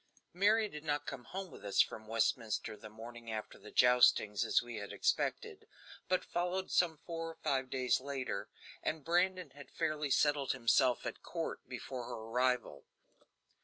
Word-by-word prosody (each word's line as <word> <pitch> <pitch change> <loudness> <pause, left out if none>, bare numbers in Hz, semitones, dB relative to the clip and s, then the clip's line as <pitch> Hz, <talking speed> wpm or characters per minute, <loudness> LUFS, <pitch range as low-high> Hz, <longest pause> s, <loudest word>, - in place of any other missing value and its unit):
Mary 210 +4 +4
did 150 -6 -9
not 145 -2 -1
come 130 -3 -6
home 190 -1 -6
with - - -12
us 100 -1 -1
from 110 0 +2
Westminster 115 0 0
the 110 0 -11
morning 115 +1 -9
after 110 -1 -5
the - - -12
joustings, 125 -4 +5
as - - +3
we 120 -2 -6
had 100 -1 -6
expected, - - -1 0.4
but 185 - +1
followed 180 +2 -2
some 170 -3 +3
four 165 -1 -4
or 165 - -9
five 135 -3 0
days 130 -1 +2
later, 130 -7 -3 0.3
and 155 -3 -3
Brandon 180 -1 +1
had 140 +1 -12
fairly 150 -1 -1
settled 145 -1 +3
himself 125 0 +3
at - - -5
court - - -4
before 125 -2 -5
her - - -5
arrival. 125 +3 0
130 Hz, 165 wpm, -34 LUFS, 115-165 Hz, 0.4 s, joustings